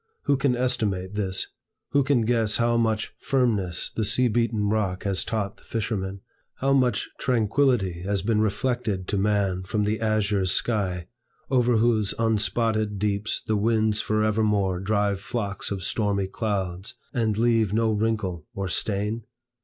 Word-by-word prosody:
Who 145 - +3
can 135 -1 +1
estimate 110 -7 -1
this? 95 -3 -1 0.4
Who 140 0 +3
can 135 -3 +2
guess 110 -2 +2
how 120 0 +2
much 110 -2 0
firmness 105 -10 0
the 110 - 0
sea 125 +4 +3
beaten 115 -2 +1
rock 100 -3 0
has 100 -2 0
taught 110 -3 -3
the - - -21
fisherman? 100 -4 -3 0.3
how 135 +1 +1
much 130 -3 +2
tranquillity 115 -6 +1
has 100 +1 -1
been 110 0 +2
reflected 110 -3 -1
to 100 - 0
man 100 -2 +1
from 105 +3 -1
the 105 +1 0
azure 105 -3 +1
sky, 95 -4 0 0.5
over 125 -2 +3
whose 110 -2 +2
unspotted 110 -1 +1
deeps 100 +1 -1
the 110 - 0
winds 110 0 +2
forevermore 105 -3 +1
drive 100 0 0
flocks 100 -3 -3
of 95 -2 -3
stormy 100 -1 0
clouds, 95 0 -3 0.2
and 110 -4 0
leave 115 -3 +3
no 110 +1 +2
wrinkle 105 -6 -1
or 100 -1 -2
stain? 105 +4 -2
110 Hz, 145 wpm, -25 LUFS, 100-115 Hz, 0.5 s, Who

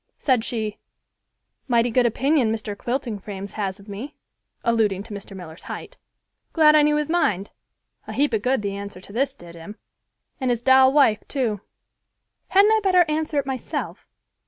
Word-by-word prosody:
Said 255 -5 +1
she, 220 -3 -3 0.9
"Mighty 240 -1 +2
good 245 +1 +3
opinion 265 0 +2
Mr. 215 -2 -4
Quilting 240 -1 -3
frames 200 0 -7
has 200 -2 -3
of 200 - -16
me 215 +8 -7 0.5
(alluding 215 -4 +1
to 210 - -10
Mr. 200 -1 -8
Miller's 165 -2 -10
height), - - -7 0.6
glad 305 -2 +6
I 305 - +7
know 300 0 +3
his 300 -1 -1
mind. 210 - 0 0.6
A 215 - -6
heap 275 +2 +1
of 220 - +1
good 255 -1 0
the 200 -1 -2
answer 200 -2 -7
to 200 +2 -13
this 270 +3 0
did 170 -5 -13
him, 170 +5 -10 0.6
and 260 -2 -1
his 240 -1 -1
doll 260 0 +6
wife, 270 -7 +4
too. 230 -8 -1 0.9
Hadn't 400 +3 +5
I 440 - +4
better 365 -3 +4
answer 305 0 -1
it 280 - +1
myself? 265 -2 -5
235 Hz, 175 wpm, -23 LUFS, 205-280 Hz, 0.9 s, I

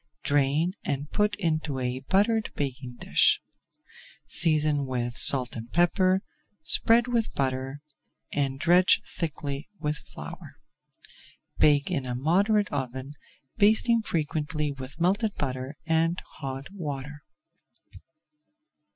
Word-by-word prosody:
Drain 145 +5 +1
and 145 +1 -4
put 210 0 +1
into 155 -6 -2
a 125 0 -3
buttered 205 - +1
baking 130 -3 -5
dish. - - +3 0.9
Season 150 -4 +1
with 120 -2 -3
salt 130 -2 +8
and 115 0 -8
pepper, 185 +2 +2 0.4
spread 230 +8 +4
with 235 -2 -1
butter, 135 +1 -3 0.5
and 135 -2 -1
dredge 175 +4 +4
thickly 145 -3 -5
with 150 -1 -2
flour. - - -11 1.0
Bake 145 +2 +3
in 135 -7 -2
a 125 - -3
moderate 200 - +1
oven, 130 0 -4 0.5
basting 220 +3 +3
frequently 150 -4 -2
with 135 +3 -9
melted 200 +5 +1
butter 130 +1 -4
and 165 +2 +1 0.2
hot 135 +2 -6
water. 145 -5 -6
150 Hz, 110 wpm, -26 LUFS, 135-180 Hz, 1.0 s, salt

